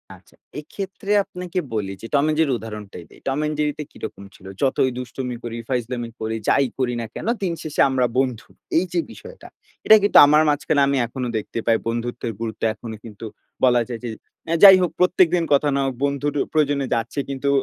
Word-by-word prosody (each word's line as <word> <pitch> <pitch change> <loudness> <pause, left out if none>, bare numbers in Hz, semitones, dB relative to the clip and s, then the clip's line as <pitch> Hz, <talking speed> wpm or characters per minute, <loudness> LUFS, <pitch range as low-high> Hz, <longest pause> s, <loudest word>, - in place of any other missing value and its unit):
আচ্ছা, - - -23 0.2
এক্ষেত্রে 195 +5 -6
আপনাকে 180 -1 -5
বলি 100 -3 -2
যে 115 - -7
টম 140 -1 +4
অ্যান্ড 155 0 0
জেরির 145 -5 +2
উদাহরণটাই 105 -5 -9
দেই। - - -18
টম 135 +2 0
অ্যান্ড 150 0 -1
জেরিতে 150 0 -1
কিরকম 100 - -8
ছিল? 95 - -18 0.2
যতই 130 -1 +2
দুষ্টমি 125 0 -5
করি, 120 -1 -5
ফাইজলামি 120 -1 -2
করি, 110 0 -2
যাই 140 - +4
করি 125 -2 0
না - - -4
কেন? - - -6 0.2
দিন 180 -3 0
শেষে 155 -2 -1
আমরা 130 -1 +1
বন্ধু। 125 -4 -1 0.3
এইযে 175 0 0
বিষয়টা। - - -12 0.4
এটা 220 - +9
কিন্তু 205 - +4
আমার 150 +2 +5
মাঝখানে 145 0 +1
আমি 140 0 +1
এখনো 125 +1 -4
দেখতে 110 +2 -5
পাই। 115 -1 +3
বন্ধুত্বের 120 0 -3
গুরুত্ব 115 -1 -5
এখনো 110 0 -8
কিন্তু 110 0 -9 0.4
বলা 125 -2 +5
যায় 120 -2 -5
যে 120 - -4 0.4
অ্যা 165 - +1
যাই 195 -2 +11
হোক, 180 - 0
প্রত্যেকদিন 180 -1 +3
কথা 145 +1 +3
না 140 - +1
হোক, 135 - -1
বন্ধুর 140 +1 -1 0.2
প্রয়োজনে 145 -3 +1
যাচ্ছে। 115 +4 -2
কিন্তু 140 0 -2
135 Hz, 190 wpm, -22 LUFS, 120-155 Hz, 0.4 s, যাই